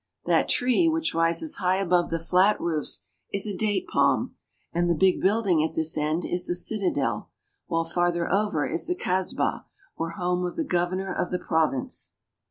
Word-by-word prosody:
That -, -, +2 dB
tree 255 Hz, +7 st, +3 dB
which 320 Hz, 0 st, -1 dB
rises 165 Hz, -, +1 dB
high 185 Hz, 0 st, +1 dB
above 180 Hz, -2 st, +1 dB
the 165 Hz, -, -1 dB
flat 185 Hz, +5 st, +3 dB
roofs 160 Hz, -3 st, -1 dB, 0.3 s
is 200 Hz, +1 st, 0 dB
a 205 Hz, -2 st, -3 dB
date 205 Hz, 0 st, 0 dB
palm, -, -, +1 dB, 0.4 s
and 175 Hz, +1 st, +1 dB
the 170 Hz, -, +3 dB
big 185 Hz, +3 st, +3 dB
building 195 Hz, -5 st, +2 dB
at 160 Hz, -, -3 dB
this 160 Hz, 0 st, 0 dB
end 155 Hz, +3 st, -1 dB
is 180 Hz, 0 st, -2 dB
the 175 Hz, -, 0 dB
citadel, 175 Hz, -, -1 dB, 0.4 s
while 165 Hz, 0 st, 0 dB
farther 175 Hz, 0 st, 0 dB
over 200 Hz, -7 st, +1 dB
is 170 Hz, -, -1 dB
the 360 Hz, -, 0 dB
kasbah, 185 Hz, -, -1 dB, 0.3 s
or 165 Hz, -, -3 dB
home 180 Hz, +1 st, -1 dB
of 180 Hz, -, -3 dB
the 325 Hz, -, -2 dB
governor 185 Hz, -1 st, -1 dB
of -, -, -2 dB
the 180 Hz, -, -1 dB
province. 160 Hz, -7 st, -2 dB
180 Hz, 180 wpm, -26 LUFS, 165-195 Hz, 0.4 s, tree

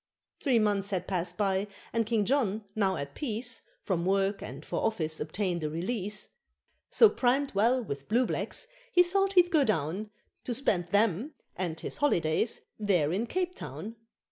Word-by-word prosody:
Three 265 Hz, -5 st, +3 dB
months 205 Hz, -2 st, +2 dB
had 185 Hz, -3 st, -2 dB
passed 180 Hz, -2 st, -2 dB
by, 195 Hz, -1 st, +1 dB, 0.3 s
and 230 Hz, -2 st, +1 dB
King 220 Hz, -3 st, +2 dB
John, 225 Hz, -5 st, +1 dB
now 195 Hz, -3 st, +1 dB
at 140 Hz, 0 st, -5 dB
peace, 240 Hz, -2 st, -4 dB, 0.2 s
From 175 Hz, -4 st, 0 dB
work 195 Hz, +2 st, +1 dB
and 135 Hz, +7 st, -8 dB
for -, -, -2 dB
office 160 Hz, -8 st, -1 dB
obtained 175 Hz, +1 st, -2 dB
a 155 Hz, -, 0 dB
re 165 Hz, +3 st, -4 dB
lease; 210 Hz, -1 st, -2 dB, 0.6 s
So 455 Hz, -, +7 dB
primed 270 Hz, -4 st, +1 dB
well 235 Hz, +5 st, +3 dB
with 140 Hz, -8 st, -6 dB
blue 240 Hz, +4 st, +3 dB
blacks -, -, -3 dB, 0.3 s
he 355 Hz, -6 st, +7 dB
thought 390 Hz, +2 st, +1 dB
he'd 355 Hz, -1 st, +5 dB
go 310 Hz, -5 st, +5 dB
down 200 Hz, -, -1 dB, 0.4 s
To 240 Hz, -, -1 dB
spend 185 Hz, -9 st, +1 dB
them 210 Hz, -, +1 dB, 0.2 s
and 170 Hz, -3 st, -3 dB
his -, -, -5 dB
holidays 180 Hz, -, +1 dB, 0.2 s
there 180 Hz, -7 st, +2 dB
in 220 Hz, +6 st, -1 dB
Cape 360 Hz, +5 st, -1 dB
Town. 225 Hz, -, -7 dB
210 Hz, 170 wpm, -30 LUFS, 180-245 Hz, 0.6 s, So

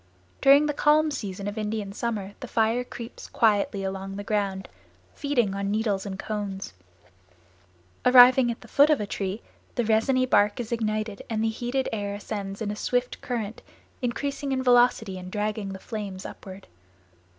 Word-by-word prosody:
During 280 Hz, +2 st, +7 dB
the 295 Hz, -, 0 dB
calm 300 Hz, +2 st, +3 dB
season 200 Hz, -6 st, -5 dB
of 205 Hz, +2 st, -4 dB
Indian 210 Hz, -2 st, -3 dB
summer 205 Hz, -3 st, -3 dB
the 255 Hz, -, -7 dB
fire 230 Hz, +2 st, +1 dB
creeps 235 Hz, -1 st, -9 dB
quietly 205 Hz, -3 st, +2 dB
along 195 Hz, 0 st, -4 dB
the 205 Hz, -, -5 dB
ground, 200 Hz, -2 st, -1 dB, 0.5 s
feeding 250 Hz, -9 st, 0 dB
on 200 Hz, 0 st, -3 dB
the -, -, -1 dB
needles 210 Hz, -2 st, 0 dB
and 190 Hz, -1 st, -5 dB
cones; 200 Hz, -, -4 dB, 1.3 s
arriving 250 Hz, 0 st, +7 dB
at 235 Hz, -, -4 dB
the 235 Hz, -, -13 dB
foot 285 Hz, +6 st, +5 dB
of 305 Hz, -, +4 dB
a 210 Hz, -, -2 dB
tree, 195 Hz, +1 st, -4 dB, 0.3 s
the 240 Hz, -, 0 dB
resiny 230 Hz, +4 st, +3 dB
bark 205 Hz, -4 st, +3 dB
is 235 Hz, -1 st, -5 dB
ignited 215 Hz, -2 st, -2 dB
and 220 Hz, -1 st, -1 dB
the 225 Hz, -, +2 dB
heated 245 Hz, +4 st, -2 dB
air 205 Hz, -2 st, -2 dB
ascends 205 Hz, 0 st, -5 dB
in 205 Hz, -, -2 dB
a -, -, -4 dB
swift 245 Hz, +3 st, -1 dB
current, 225 Hz, -4 st, -4 dB, 0.4 s
increasing 275 Hz, +3 st, -2 dB
in 260 Hz, -1 st, 0 dB
velocity 240 Hz, -6 st, +3 dB
and 185 Hz, 0 st, -9 dB
dragging 210 Hz, -1 st, -2 dB
the 190 Hz, -, -6 dB
flames 195 Hz, -2 st, -6 dB
upward. 190 Hz, 0 st, -9 dB
215 Hz, 170 wpm, -26 LUFS, 200-245 Hz, 1.3 s, During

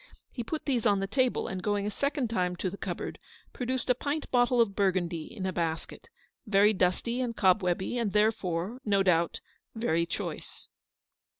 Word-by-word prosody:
He 240 Hz, -, -4 dB
put 310 Hz, +7 st, -4 dB
these 245 Hz, -5 st, +1 dB
on 200 Hz, -1 st, +3 dB
the 195 Hz, -, -1 dB
table, 255 Hz, +5 st, +1 dB
and 185 Hz, -1 st, -4 dB
going 205 Hz, 0 st, 0 dB
a 210 Hz, -, -1 dB
second 280 Hz, +2 st, -1 dB
time 180 Hz, -5 st, 0 dB
to 180 Hz, +1 st, -2 dB
the -, -, -6 dB
cupboard -, -, -5 dB, 0.3 s
produced 255 Hz, 0 st, -2 dB
a 250 Hz, -, +5 dB
pint 290 Hz, +4 st, -3 dB
bottle 245 Hz, 0 st, +3 dB
of 215 Hz, -4 st, +3 dB
Bur 200 Hz, -2 st, +3 dB
gundy, 170 Hz, -3 st, -3 dB
in 190 Hz, -4 st, -6 dB
a 185 Hz, -, -1 dB
basket; 165 Hz, -1 st, -3 dB, 0.4 s
very 205 Hz, +1 st, +5 dB
dusty 205 Hz, +7 st, 0 dB
and 235 Hz, -3 st, -3 dB
cobwebby; 190 Hz, +3 st, +2 dB
and 220 Hz, -4 st, 0 dB
therefore, 210 Hz, 0 st, 0 dB
no 200 Hz, -2 st, +2 dB
doubt, 170 Hz, -3 st, +2 dB, 0.3 s
very 170 Hz, -7 st, +1 dB
choice. -, -, -6 dB
205 Hz, 180 wpm, -29 LUFS, 185-240 Hz, 0.4 s, a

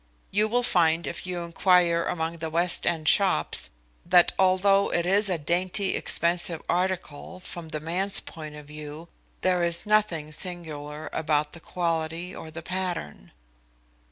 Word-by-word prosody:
You 210 Hz, +2 st, +2 dB
will 245 Hz, +3 st, +1 dB
find 170 Hz, -6 st, +3 dB
if 170 Hz, -, -5 dB
you 180 Hz, -1 st, -3 dB
inquire 170 Hz, 0 st, +3 dB
among 165 Hz, 0 st, -2 dB
the 160 Hz, 0 st, -4 dB
West 170 Hz, +2 st, +2 dB
End 160 Hz, -3 st, 0 dB
shops, 195 Hz, -, +2 dB, 0.3 s
that 175 Hz, 0 st, +5 dB
although 195 Hz, +1 st, +3 dB
it 170 Hz, -, 0 dB
is 200 Hz, +3 st, +3 dB
a 180 Hz, -, 0 dB
dainty, 180 Hz, +5 st, 0 dB
expensive 170 Hz, -1 st, +2 dB
article 185 Hz, -1 st, -2 dB
from 175 Hz, -3 st, -8 dB
the 155 Hz, -, -4 dB
man's 180 Hz, +6 st, -1 dB
point 155 Hz, -2 st, -9 dB
of 150 Hz, -1 st, -11 dB
view, 150 Hz, +2 st, -9 dB, 0.3 s
there 180 Hz, -1 st, +2 dB
is 170 Hz, +2 st, 0 dB
nothing 210 Hz, -8 st, +1 dB
singular 155 Hz, -3 st, -4 dB
about 150 Hz, -1 st, 0 dB
the 170 Hz, -, -10 dB
quality 165 Hz, +1 st, -3 dB
or 160 Hz, -, -8 dB
the 165 Hz, +1 st, -8 dB
pattern." 180 Hz, -, -4 dB
170 Hz, 150 wpm, -26 LUFS, 160-185 Hz, 0.3 s, that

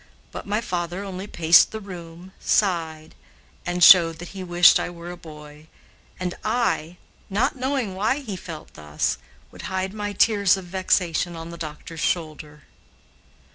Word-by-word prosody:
But -, -, -8 dB
my 210 Hz, +2 st, 0 dB
father 180 Hz, -2 st, -3 dB
only 190 Hz, 0 st, -6 dB
paced 165 Hz, -3 st, +5 dB
the 220 Hz, -, -5 dB
room, 175 Hz, -2 st, -10 dB
sighed, 160 Hz, -6 st, 0 dB, 0.5 s
and 175 Hz, 0 st, 0 dB
showed 165 Hz, -3 st, +8 dB
that 175 Hz, +1 st, -9 dB
he 190 Hz, 0 st, -7 dB
wished 175 Hz, 0 st, +6 dB
I -, -, -3 dB
were 175 Hz, 0 st, -9 dB
a -, -, -7 dB
boy; 150 Hz, -2 st, -13 dB, 0.5 s
and 180 Hz, -1 st, -3 dB
I, 215 Hz, -7 st, -1 dB, 0.3 s
not 205 Hz, +8 st, 0 dB
knowing 260 Hz, -5 st, -2 dB
why 210 Hz, +8 st, 0 dB
he 240 Hz, -9 st, -6 dB
felt 165 Hz, -3 st, -9 dB
thus, 75 Hz, -1 st, -2 dB, 0.3 s
would -, -, -11 dB
hide 190 Hz, +1 st, -2 dB
my 205 Hz, -1 st, -4 dB
tears 200 Hz, -2 st, +3 dB
of 190 Hz, -, -8 dB
vexation 175 Hz, -2 st, 0 dB
on 165 Hz, +1 st, -8 dB
the -, -, -8 dB
doctor's 160 Hz, 0 st, -8 dB
shoulder. 155 Hz, -3 st, -3 dB
175 Hz, 155 wpm, -23 LUFS, 165-195 Hz, 0.5 s, showed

